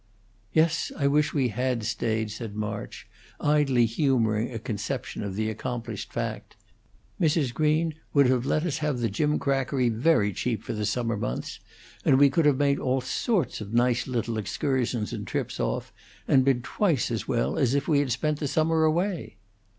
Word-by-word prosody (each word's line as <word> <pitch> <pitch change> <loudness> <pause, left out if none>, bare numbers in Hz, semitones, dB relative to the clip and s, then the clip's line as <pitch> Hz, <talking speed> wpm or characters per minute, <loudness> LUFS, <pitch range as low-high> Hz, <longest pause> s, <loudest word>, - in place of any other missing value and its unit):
"Yes, 165 0 +2
I 140 - 0
wish 150 +1 +3
we 135 -4 +1
had 125 +1 -1
stayed," 110 0 -1
said 105 -1 -6
March, 105 -1 -5 0.3
idly 145 -5 +3
humoring 115 -2 +1
a 115 - -4
conception 115 +2 -4
of 100 -2 -4
the 110 +1 -1
accomplished 115 +2 -5
fact. - - -4 0.7
"Mrs. 150 -6 +2
Green 155 +2 +1 0.2
would 140 -1 +5
have 125 -1 +2
let 155 +4 0
us 160 -2 -1
have 150 -3 -1
the 115 -3 -1
gimcrackery 135 -1 +1
very 115 -3 +2
cheap 115 -1 -2
for - - -4
the 105 -1 -2
summer 115 -3 -1
months; 60 -11 -4 0.4
and 130 - +4
we 140 0 +6
could 155 +2 +3
have 140 -3 +4
made 140 0 +2
all 130 0 0
sorts 165 - -1
of 105 +2 -5
nice 120 0 +2
little 115 -3 -2
excursions 120 +2 -1
and - - -5
trips - - -3
off - - -2 0.3
and 130 - +5
been 130 -3 +2
twice 165 - 0
as 115 - -3
well 115 -2 0
as 135 -2 +2
if 140 - 0
we 150 -3 +3
had 140 -3 0
spent 150 +4 0
the 145 - -1
summer 160 +2 +2
away." 170 - -1
130 Hz, 175 wpm, -26 LUFS, 115-150 Hz, 0.7 s, we